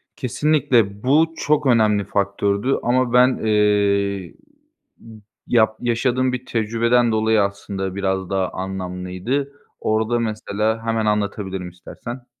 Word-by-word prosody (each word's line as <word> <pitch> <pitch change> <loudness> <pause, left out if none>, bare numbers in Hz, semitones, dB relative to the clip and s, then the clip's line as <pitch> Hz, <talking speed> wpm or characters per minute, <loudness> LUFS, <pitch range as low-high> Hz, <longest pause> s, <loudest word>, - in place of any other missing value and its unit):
Kesinlikle 125 -6 +1
bu 155 +5 +3
çok 150 0 +1
önemli 110 -4 +3
faktördü. 100 +4 0
Ama 125 0 +1
ben, 125 +1 +5
eee, 100 -3 +1 1.1
yap 110 -2 +3
yaşadığım 125 +2 0
bir 125 0 -4
tecrübeden 115 +1 +1
dolayı 110 0 +2
aslında 100 -1 -3
biraz 95 -1 -2
daha 95 -1 0
anlamlıydı. 95 +8 -4 0.3
Orada 110 +2 0
mesela 110 0 -2
hemen 115 -1 0
anlatabilirim 100 -3 -2
istersen. 120 +8 -9
110 Hz, 105 wpm, -21 LUFS, 100-120 Hz, 1.1 s, ben